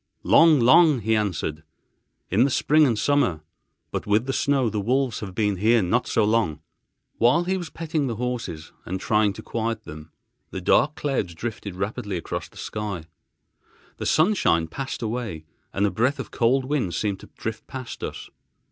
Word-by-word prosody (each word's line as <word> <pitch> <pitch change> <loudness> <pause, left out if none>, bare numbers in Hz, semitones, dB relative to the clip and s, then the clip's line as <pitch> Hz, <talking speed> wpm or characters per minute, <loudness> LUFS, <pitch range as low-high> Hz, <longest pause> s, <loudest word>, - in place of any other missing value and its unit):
"Long, 160 -3 +6
long," 130 +3 +6
he 110 +1 +1
answered, 90 -7 -2 0.7
"in 105 +6 +4
the 140 - +3
spring 150 +3 +4
and 115 -4 0
summer; 105 - +1 0.5
but - - -4
with 105 +3 +2
the 135 - -2
snow 135 -3 +2
the 105 -2 -1
wolves 125 +2 0
have 95 -4 -7
been 105 -3 +1
here 110 +3 +3
not 120 +6 +1
so 110 - +2
long." 105 -8 +1 0.6
Whilst 150 +10 +3
he 190 - +1
was 175 -3 -4
petting 160 -3 -2
the 115 - -2
horses 115 -10 -4
and 95 +2 -4
trying 105 0 +2
to - - -10
quiet 115 -1 -3
them, 75 -2 -10 0.4
dark 100 +10 +2
clouds 120 - -2
drifted 105 -1 -5
rapidly 100 +1 -3
across 85 - -5
the - - -18
sky. 105 -6 -5 0.9
The - - -3
sunshine 155 - +3
passed 130 +8 -5
away, 110 -8 -4 0.3
and 100 - +1
a 100 - +1
breath 130 +5 +1
of - - -7
cold 130 +3 +2
wind 130 - -1
seemed 100 0 -1
to - - -14
drift 110 0 -5
past 130 -2 -7
us. - - -6
115 Hz, 175 wpm, -24 LUFS, 100-135 Hz, 0.9 s, Long